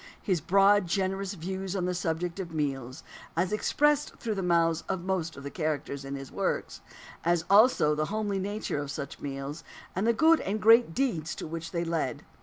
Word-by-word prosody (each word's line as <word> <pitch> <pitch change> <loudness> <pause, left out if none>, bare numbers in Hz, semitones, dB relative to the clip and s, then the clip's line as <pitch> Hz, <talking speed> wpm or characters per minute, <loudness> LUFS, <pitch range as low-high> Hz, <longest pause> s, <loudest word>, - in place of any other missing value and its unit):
His 185 -6 0
broad, 195 +2 +4
generous 195 +2 -1
views 190 +2 -4
on 180 -2 0
the 180 - 0
subject 170 +1 -2
of 175 -3 -5
meals, 135 -3 -3 0.3
as 180 +4 +1
expressed 295 +6 +2
through 225 - -3
the 195 - -2
mouths 170 -2 +2
of 190 -2 -2
most 180 -5 -2
of 140 - -9
the 140 - -6
characters 150 -4 -3
in 135 0 -5
his 135 -1 -8
works; - - -2 0.4
as 170 0 +1
also 205 -7 +6
the 155 0 0
homely 205 +1 -2
nature 205 -5 -3
of 145 -1 -4
such 140 -1 -6
meals, 140 +3 -5 0.3
and 195 +5 0
the - - +6
good 320 +7 +5
and 205 +3 -2
great 225 -5 +5
deeds 205 - -1
to - - -6
which 165 0 -5
they 170 0 -2
led. 165 -7 -2
175 Hz, 195 wpm, -28 LUFS, 155-200 Hz, 0.4 s, also